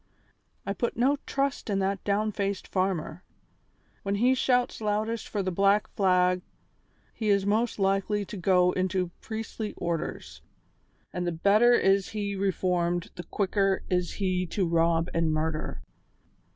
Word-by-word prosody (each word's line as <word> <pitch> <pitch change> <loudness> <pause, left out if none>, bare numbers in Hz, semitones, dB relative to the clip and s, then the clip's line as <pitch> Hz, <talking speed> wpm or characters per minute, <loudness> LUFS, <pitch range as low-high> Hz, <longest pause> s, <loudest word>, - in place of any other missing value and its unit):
I 200 - -1
put 235 +3 -2
no 270 +4 +3
trust 275 -3 -1
in 200 - +1
that 195 0 -1
downfaced 200 -1 -1
farmer. 185 -2 -2 0.8
When 200 0 -1
he 245 +5 +3
shouts 250 -2 +1
loudest 215 +2 -1
for 205 -2 -2
the 185 - -1
black 200 +3 +3
flag 180 -2 +2 0.7
he 220 -2 -2
is 200 -1 +3
most 220 +3 +1
likely 195 +1 +1
to 210 - -8
go 180 -1 +3
into 185 -1 -1
priestly 220 -1 -5
orders, 170 -2 -4 0.7
and 180 0 -2
the - - +1
better 205 +8 +4
is 195 -4 +3
he 205 -2 -3
reformed 180 -3 0
the 175 - -7
quicker 195 -1 0
is 180 -1 0
he 185 -2 -1
to 185 +1 -1
rob 165 0 +2
and 165 -1 +1
murder. 155 0 -2
195 Hz, 140 wpm, -27 LUFS, 180-210 Hz, 0.8 s, better